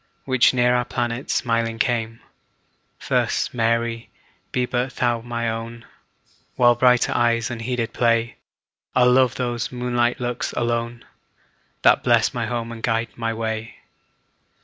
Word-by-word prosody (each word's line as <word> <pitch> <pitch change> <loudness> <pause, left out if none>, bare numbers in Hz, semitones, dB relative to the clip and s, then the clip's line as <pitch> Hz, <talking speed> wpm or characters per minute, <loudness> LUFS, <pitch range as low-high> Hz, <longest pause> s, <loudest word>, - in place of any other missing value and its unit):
Which 130 -2 +4
near 125 -1 +2
our 125 0 +2
planet 120 +2 -3
smiling 115 -2 0
came; 115 -1 -1 0.9
Thus, - - 0
Mary, 115 0 -1 0.4
be 125 - 0
but 125 +1 -2
thou 120 -2 0
my 120 0 -3
own; 115 +1 -5 0.7
While 120 -2 +5
brighter 125 0 +3
eyes 115 0 +1
unheeded 115 0 -3
play, 115 -1 +1 0.6
I'll 125 0 +5
love 130 0 +3
those 120 -2 -3
moonlight 120 -1 0
looks 120 -1 -3
alone, 120 0 -2 0.8
That - - +5
bless - - +3
my 120 -2 -2
home 115 -1 -3
and 115 -1 -8
guide 115 0 0
my 115 -1 -3
way. 110 0 -4
120 Hz, 130 wpm, -22 LUFS, 115-125 Hz, 0.9 s, While